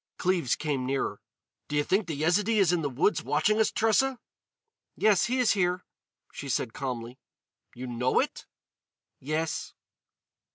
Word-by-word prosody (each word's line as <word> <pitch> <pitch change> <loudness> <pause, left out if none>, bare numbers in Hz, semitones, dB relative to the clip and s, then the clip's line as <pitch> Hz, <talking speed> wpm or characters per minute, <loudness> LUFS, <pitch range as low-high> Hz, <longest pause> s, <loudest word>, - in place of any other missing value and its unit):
Cleves 175 -9 +1
came 145 -4 -2
nearer: 135 +1 -2 0.5
"Do 150 - -4
you 145 - +3
think 195 +5 +1
the 160 - -3
Yezidee 200 +8 +2
is 185 -4 +4
in 175 - +1
the 145 - -1
woods 145 +11 +1
watching 205 +9 +1
us, 220 - +4
Tressa?" 255 +4 +2 0.8
"Yes, 210 -4 +3
he 250 +2 0
is 250 -3 +4
there," 180 -2 0 0.5
she 140 - -7
said 120 -2 -1
calmly. 125 -2 -5 0.6
"You 125 +1 -6
know 125 +1 +1
it?" - - -2 0.7
"Yes." 155 +3 -3
165 Hz, 150 wpm, -28 LUFS, 135-205 Hz, 0.8 s, is